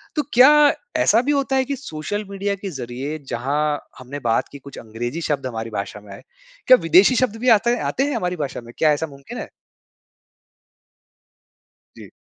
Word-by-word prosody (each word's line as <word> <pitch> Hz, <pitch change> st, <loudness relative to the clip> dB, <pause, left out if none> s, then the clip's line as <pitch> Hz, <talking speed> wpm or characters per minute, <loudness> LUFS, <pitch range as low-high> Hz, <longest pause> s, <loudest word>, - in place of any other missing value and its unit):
तो, 300 Hz, -, +2 dB
क्या 255 Hz, +4 st, +8 dB, 0.5 s
ऐसा 225 Hz, -, +4 dB
भी 285 Hz, +4 st, 0 dB
होता 275 Hz, -1 st, 0 dB
है 265 Hz, -, +2 dB
कि 280 Hz, +2 st, -3 dB
सोशल 205 Hz, -, -5 dB
मीडिया 200 Hz, 0 st, -2 dB
के 195 Hz, 0 st, -7 dB
ज़रिए 135 Hz, +2 st, -5 dB
जहाँ 130 Hz, +5 st, -2 dB, 0.4 s
हमने 130 Hz, +3 st, -7 dB
बात 115 Hz, -, +1 dB
की 140 Hz, -, -10 dB
कुछ 140 Hz, 0 st, -12 dB
अंग्रेजी 120 Hz, +7 st, -5 dB
शब्द 140 Hz, -2 st, -1 dB
हमारी 115 Hz, -2 st, -5 dB
भाषा 100 Hz, +1 st, -6 dB
में 105 Hz, -, -14 dB
आए, -, -, -11 dB, 0.5 s
क्या 255 Hz, -, +9 dB
विदेशी 180 Hz, +9 st, +5 dB
शब्द 245 Hz, -3 st, +1 dB
भी 250 Hz, -, +2 dB
आता 235 Hz, -, -1 dB
हैं 245 Hz, -, -1 dB
आते 265 Hz, -, 0 dB
हैं, 285 Hz, -1 st, -1 dB
हमारी 180 Hz, -5 st, -2 dB
भाषा 135 Hz, -, -7 dB
में? 120 Hz, 0 st, -13 dB
क्या 155 Hz, -, +4 dB
ऐसा 160 Hz, +2 st, -2 dB
मुमकिन 140 Hz, -, -11 dB
है? -, -, -6 dB, 2.5 s
जी। -, -, -12 dB
160 Hz, 185 wpm, -21 LUFS, -, 2.5 s, क्या